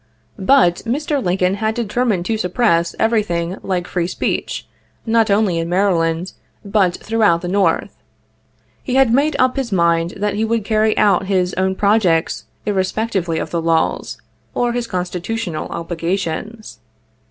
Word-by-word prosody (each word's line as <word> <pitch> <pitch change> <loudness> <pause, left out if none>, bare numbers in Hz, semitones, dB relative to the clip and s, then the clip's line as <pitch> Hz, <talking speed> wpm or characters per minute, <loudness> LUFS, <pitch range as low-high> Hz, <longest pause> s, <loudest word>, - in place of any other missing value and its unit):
But 190 -5 +4
Mr. 280 +3 -2
Lincoln 180 +1 +1
had 220 0 0
determined 225 -5 0
to 225 - 0
suppress 180 -4 +1
everything 195 -6 0
like 180 -2 -2
free 175 -2 -2
speech, - - -3 0.4
not 225 -1 +2
only 200 -4 +2
in 165 0 -3
Maryland, 175 -2 +1 0.3
but 200 -3 +2
throughout 210 -6 +1
the 180 - -4
North. 190 -3 +1 0.9
He 255 - -3
had 265 -4 +4
made 285 +4 +2
up 255 +1 +2
his 260 -4 -2
mind 170 -1 +1
that 205 0 -1
he 210 +2 -1
would 225 -1 0
carry 215 0 +2
out 195 -2 +3
his 185 -2 +1
own 190 0 0
projects 195 -5 +1 0.2
irrespectively 190 -3 -1
of - - -4
the 170 - -1
laws, 165 0 0 0.4
or 240 -1 +1
his 240 -1 -2
constitutional 180 0 -3
obligations. 175 +5 -4
195 Hz, 140 wpm, -18 LUFS, 175-225 Hz, 0.9 s, But